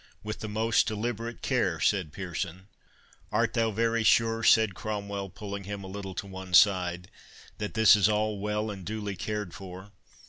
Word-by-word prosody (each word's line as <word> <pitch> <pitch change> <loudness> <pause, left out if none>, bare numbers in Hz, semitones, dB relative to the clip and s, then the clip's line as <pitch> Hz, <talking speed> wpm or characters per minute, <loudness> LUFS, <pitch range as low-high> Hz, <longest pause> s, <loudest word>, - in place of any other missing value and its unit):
"With 105 0 -5
the 110 - -5
most 110 +1 +2
deliberate 115 +1 -4
care," - - +1
said 95 -7 +1
Pearson. 95 0 -5 0.6
"Art 115 -1 +1
thou 115 -2 +2
very 115 +2 +1
sure," 115 0 +3
said 110 -2 +5
Cromwell, 100 -1 -4
pulling 100 -1 -7
him 100 0 -6
a - - -7
little 95 -1 -7
to - - -4
one 95 -1 -3
side, 90 -2 +4 0.5
"that 105 -1 -4
this 110 -1 +7
is 105 0 +3
all 105 -1 0
well 105 +1 -2
and 95 -2 -8
duly 105 0 -4
cared 105 -1 -4
for? 95 0 -10
105 Hz, 170 wpm, -28 LUFS, 95-110 Hz, 0.6 s, this